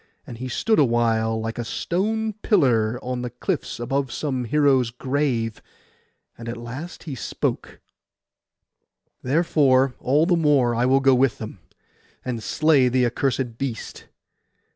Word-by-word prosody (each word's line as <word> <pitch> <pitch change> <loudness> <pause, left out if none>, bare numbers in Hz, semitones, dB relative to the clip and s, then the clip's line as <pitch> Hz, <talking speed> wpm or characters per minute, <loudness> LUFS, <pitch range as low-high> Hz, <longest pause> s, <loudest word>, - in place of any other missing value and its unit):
And 120 - -9
he 130 - -4
stood 220 - +1
awhile 115 -4 +2
like 115 +2 -4
a - - 0
tall - - -6
stone 215 - -1
pillar 120 - +2
on 125 0 -3
the 125 - -4
cliffs 135 +5 -4
above 135 +2 -2
some 130 -5 -2
hero's 135 -2 +3
grave; 125 -2 -2 0.7
and 115 0 -8
at 115 - -5
last 130 +9 -8
he 155 - -6
spoke— 125 - -4 1.4
'Therefore 135 -3 +2
all 145 +5 +2
the 175 0 +3
more 145 -7 +3
I 120 +2 +1
will 135 +1 +4
go 135 0 +5
with 130 -1 +2
them, 110 -3 -8 0.7
and 120 -3 -3
slay 145 -1 +3
the 125 0 +2
accursed 120 -1 -1
beast. 130 -5 -5
130 Hz, 140 wpm, -23 LUFS, 120-145 Hz, 1.4 s, go